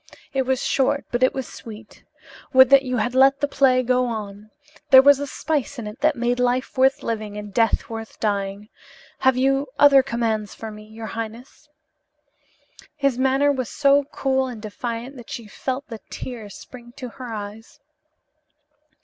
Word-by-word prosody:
It 265 -2 0
was 260 -1 0
short 280 +1 +1
but 240 - -1
it 255 - +4
was 265 -2 -5
sweet. 220 -1 -12 0.5
Would 260 0 +7
that 275 -1 +8
you 255 -2 -3
had 245 +3 -1
let 270 +2 +5
the 285 - +1
play 260 -2 +3
go 250 +1 +2
on. 210 -2 -6 0.4
There 265 - +10
was 285 0 +6
a 285 - -3
spice 285 -1 -2
in 235 - -6
it 210 +2 -8
that 305 0 +3
made 245 0 -1
life 250 +1 0
worth 265 +1 +3
living 215 -2 -4
and 210 -1 -8
death 225 0 +1
worth 225 -1 -7
the - - -22
dying. 200 0 -2 0.5
Have 260 -1 +3
you 270 +2 +1
other 285 -1 +7
commands 230 -5 -2
for 220 -1 -7
me, 210 0 -11
your 220 +1 -9
highness?" 230 +7 -8 1.3
His 275 -3 0
manner 270 +2 +3
was 260 -4 -3
so 280 0 +3
cool 265 -1 -1
and 245 -3 -7
defiant 235 +4 -6
that 240 - -12
she 235 - -6
felt 260 +6 -5
the 225 -2 -8
tears 220 -6 -8
spring 240 -1 -13
to 255 - -6
her 245 0 -9
eyes. 215 +5 -8
250 Hz, 175 wpm, -22 LUFS, 225-270 Hz, 1.3 s, There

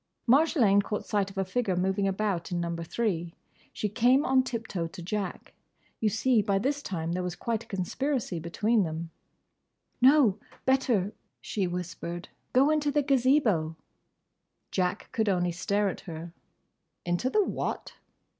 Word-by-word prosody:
Marjolaine 245 - +5
caught 210 +1 -4
sight 200 -2 0
of 195 - -13
a 195 - +1
figure 195 -1 0
moving 190 +2 +1
about 195 -3 -1
in 175 - 0
Number 170 -1 -3
Three. 175 -3 -2 0.4
She 210 - -2
came 250 +6 +3
on 260 0 +4
tip 230 -3 -4
toe 170 -6 -3
to 175 +2 -10
Jack. 195 +1 -4 0.5
You 220 - +2
see, 225 +2 +3
by 200 -1 +1
this 275 +8 0
time 165 - -3
there 180 +1 -1
was 180 -1 -3
quite 230 +2 -2
a - - -28
conspiracy 210 - -2
between 210 +7 +1
them. 165 -1 -3 0.9
"No! 255 -6 +6 0.3
Better!" 245 -7 +2 0.3
she 195 -3 -2
whispered. 175 0 -5 0.2
"Go 275 +4 +4
into 300 -1 +1
the 290 0 +2
Gazebo." 250 - +2 1.0
Jack 185 +1 -1
could 220 -2 +1
only 180 -2 +1
stare 200 +4 0
at 190 - -3
her. 170 -2 -8 0.7
"Into 175 +9 0
the 420 +8 +3
what?" - - -3
200 Hz, 155 wpm, -28 LUFS, 175-245 Hz, 1.0 s, No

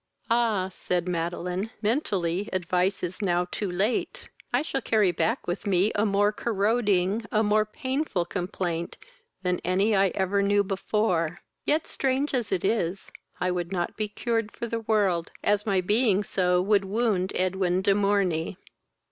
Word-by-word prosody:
"Ah! 225 -5 +2
(said 180 -1 -2
Madeline,) 180 +3 -2
mentally, 205 - 0
advice 185 +1 0
is 180 +3 -4
now 180 -3 +1
too 200 -4 -2
late. 200 +7 -1 0.2
I 245 +4 +2
shall 270 -3 -2
carry 215 -5 +3
back 225 +8 -1
with 175 +3 -3
me 195 +2 +3
a 210 +2 +1
more 205 +1 +3
corroding, 210 -1 +1
a 215 0 +3
more 215 0 +3
painful 260 - -2
complaint 175 -2 -3 0.5
than 180 -1 0
any 195 +4 +2
I 195 0 +4
ever 195 +1 +1
knew 205 0 +3
before; 190 -4 -1 0.2
yet, 310 +2 +2
strange 270 +2 -1
as 240 -5 -1
it 190 -2 0
is, 195 -3 -1 0.3
I 180 0 +1
would 175 0 -3
not 175 -2 -2
be 215 0 -2
cured 225 0 -2
for - - -5
the 230 0 -2
world, 200 -7 +1
as 205 +1 +1
my 195 -2 +2
being 210 +1 +2
so 180 -2 +1
would 200 0 +3
wound 200 -2 0
Edwin 185 0 +1
de 200 - +4
Morney. 195 -4 +1
195 Hz, 155 wpm, -26 LUFS, 180-215 Hz, 0.5 s, I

